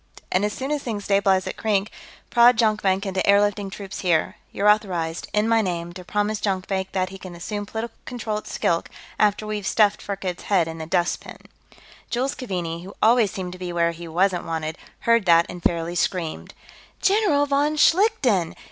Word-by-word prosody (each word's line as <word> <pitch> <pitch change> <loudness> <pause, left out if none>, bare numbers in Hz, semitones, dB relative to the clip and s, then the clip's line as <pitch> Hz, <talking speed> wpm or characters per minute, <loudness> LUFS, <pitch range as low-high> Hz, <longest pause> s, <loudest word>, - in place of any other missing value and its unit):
And 185 - +2
as 210 - +1
soon 265 +6 -4
as 295 -1 0
things 215 -5 -4
stabilize 195 -2 +2
at - - -5
Krink, 210 -2 0 0.4
prod 240 0 +6
Jonkvank 210 -3 +2
into 190 -1 -2
airlifting 200 0 +2
troops 195 -1 -7
here. 170 -4 +1
You're 205 - 0
authorized, 180 -6 +1
in 210 +1 +1
my 225 0 +4
name, 175 -3 -3
to 180 0 -9
promise 210 +3 -1
Jonkvank 190 -1 -2
that 185 -1 0
he 195 0 -10
can 185 -2 -9
assume 205 +4 -5
political 225 +2 -5
control 225 -3 -3
at - - -14
Skilk, 170 0 0 0.3
after 210 0 +2
we've 210 -2 -3
stuffed 210 -2 +3
Firkked's 190 -3 -5
head 185 -5 +2
in 165 0 -7
the 160 - -6
dustbin." 175 0 -1 0.7
Jules 260 +3 -1
Keaveney, 175 -8 -4
who 195 +2 -10
always 230 -1 +4
seemed 185 -3 -5
to 185 - -11
be 180 -1 -4
where 170 -1 +1
he 170 0 -9
wasn't 180 +2 +1
wanted, 160 -1 -3 0.3
heard 230 -3 +3
that 170 -1 +5
and 180 - -8
fairly 170 0 0
screamed. 175 -2 -2 0.4
"General 390 -8 +3
von 290 +2 +1
Schlichten! 295 - +3
195 Hz, 185 wpm, -23 LUFS, 175-220 Hz, 0.7 s, prod